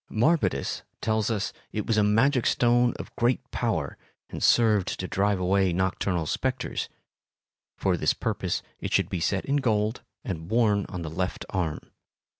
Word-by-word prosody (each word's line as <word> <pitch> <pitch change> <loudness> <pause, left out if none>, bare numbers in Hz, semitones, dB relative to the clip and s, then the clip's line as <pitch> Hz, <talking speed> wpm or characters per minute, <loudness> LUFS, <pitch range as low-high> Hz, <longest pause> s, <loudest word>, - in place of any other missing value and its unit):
Marbodus 115 - +1 0.2
tells 110 -1 0
us 105 -3 -1 0.2
it 105 -2 -3
was 115 - +1
a 105 - +4
magic 120 +5 +3
stone 120 0 +3
of - - -9
great 120 +2 +2
power 95 - -1 0.3
and - - -6
served 105 -5 +4
to 90 - -3
drive 100 +1 +1
away 95 0 +2
nocturnal 90 -1 0
spectres; 130 +9 -2 0.9
for - - +1
this - - +1
purpose - - -2 0.2
it - - -4
should - - +2
be 95 - -2
set 95 +3 0
in 140 +1 +1
gold 110 -3 0 0.2
and 80 -3 -5
worn 110 -4 +2
on 90 -3 -5
the 80 - -4
left 90 +3 -3
arm. 85 -5 -1
105 Hz, 160 wpm, -26 LUFS, 90-120 Hz, 0.9 s, a